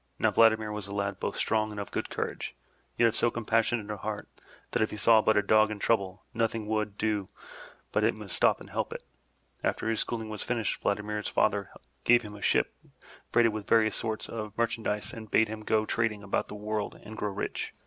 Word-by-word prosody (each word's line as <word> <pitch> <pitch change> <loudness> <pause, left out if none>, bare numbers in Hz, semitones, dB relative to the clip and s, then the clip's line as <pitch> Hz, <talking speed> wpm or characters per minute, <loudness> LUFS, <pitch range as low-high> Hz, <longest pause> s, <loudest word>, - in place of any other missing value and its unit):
Now - - +3
Vladimir 110 -1 +4
was 105 -2 -4
a 100 - -7
lad 100 -1 -2
both - - -3
strong 110 -1 +1
and 105 -1 -6
of 100 - -5
good - - -2
courage, - - -4 0.4
yet 120 - +5
of 115 - 0
so 120 - +3
compassionate 115 -1 0
a 105 - -4
heart 105 0 -4 0.4
that - - +1
if 110 - +2
he 105 - -6
saw 110 +2 +6
but 110 0 +3
a 105 - +4
dog 110 +1 +5
in 105 - -4
trouble, 100 -3 0
nothing 115 -1 0
would 105 -1 -1
do 105 -3 0 0.6
but - - +2
he - - +4
must - - -3
stop - - +4
and - - -12
help - - -2
it. - - -8 0.6
After - - 0
his 110 - -1
schooling 110 -2 -2
was 105 -1 -5
finished, 115 -4 -1
Vladimir's 105 +1 -1
father 100 -2 +1 0.3
gave 120 0 +5
him 105 -1 -8
a 105 - -11
ship - - +2 0.6
freighted 115 -2 +4
with 110 -2 -5
various 110 -2 +4
sorts 110 -1 -2
of 110 -2 -6
merchandise 115 -3 -1
and 110 -2 -8
bade 110 +1 +4
him 110 0 -5
go 110 0 +1
trading 110 -2 0
about 100 - -1
the - - -8
world 105 0 -3
and 110 - -9
grow 105 - -2
rich. 95 - -4
110 Hz, 215 wpm, -29 LUFS, 105-110 Hz, 0.6 s, saw